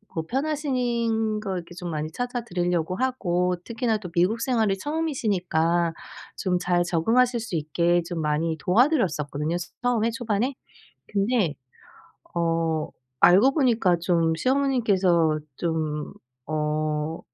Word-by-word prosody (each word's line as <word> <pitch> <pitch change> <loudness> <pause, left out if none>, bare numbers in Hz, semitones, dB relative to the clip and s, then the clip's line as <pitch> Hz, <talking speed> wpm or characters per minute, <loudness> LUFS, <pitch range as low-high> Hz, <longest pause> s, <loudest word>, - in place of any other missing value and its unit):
뭐 160 - -1
편하시닌 240 -6 0
거 195 -3 -3
이렇게 175 0 -7
좀 180 -1 -6
많이 155 0 -3
찾아 245 +4 -3
드리려고 175 -3 -1
하고 180 -7 0
특히나 230 -1 0
또 190 -5 -8
미국 185 +6 +2
생활이 225 -6 +1
처음이시니까 185 - 0 0.4
좀 185 -2 0
잘 175 -1 +1
적응하실 235 +9 +2
수 220 -6 -5
있게 170 +3 +1
좀 170 -2 -3
많이 155 +2 0
도와 230 +10 +4
드렸었거든요, 160 - -1
츠 175 - -7
처음에 230 -2 +2
초반에. 230 +3 -1 0.5
근데 200 - +1 0.8
어 165 -2 0 0.4
알고 205 +10 +6
보니까 230 - +3
좀 165 -2 +2
시어머님께서 200 - +2 0.2
좀 155 -3 -2 0.4
어 155 +1 -1
180 Hz, 275 characters per minute, -25 LUFS, 165-235 Hz, 0.8 s, 알고